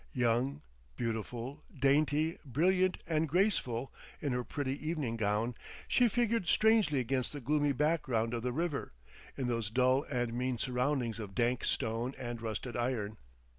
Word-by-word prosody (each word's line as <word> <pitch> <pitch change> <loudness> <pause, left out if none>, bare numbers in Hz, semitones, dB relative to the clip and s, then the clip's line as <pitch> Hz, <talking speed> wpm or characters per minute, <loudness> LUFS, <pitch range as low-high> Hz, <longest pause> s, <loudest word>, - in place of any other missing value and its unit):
Young, 125 +1 +1 0.3
beautiful, 115 - -4
dainty, 150 +4 +2
brilliant 180 +7 +2
and 160 -2 +1
graceful 140 - +1 0.3
in 145 - -1
her 125 0 0
pretty 135 +3 -2
evening 150 -8 -1
gown, 110 +2 0 0.3
she 245 - +4
figured 230 -4 +1
strangely 220 -9 +4
against 130 +2 -1
the 145 - -5
gloomy 145 +2 +2
background 135 -6 +1
of 120 - -1
the 125 +1 -1
river, 155 - -2 0.4
in 135 - -1
those 115 -3 -1
dull 130 +3 +3
and 120 -3 -1
mean 125 +1 -1
surroundings 125 -1 0
of 100 -3 -7
dank 120 +1 +1
stone 115 +2 -1
and 120 -2 -5
rusted 115 +2 -4
iron. 115 -4 -1
130 Hz, 145 wpm, -33 LUFS, 120-150 Hz, 0.4 s, she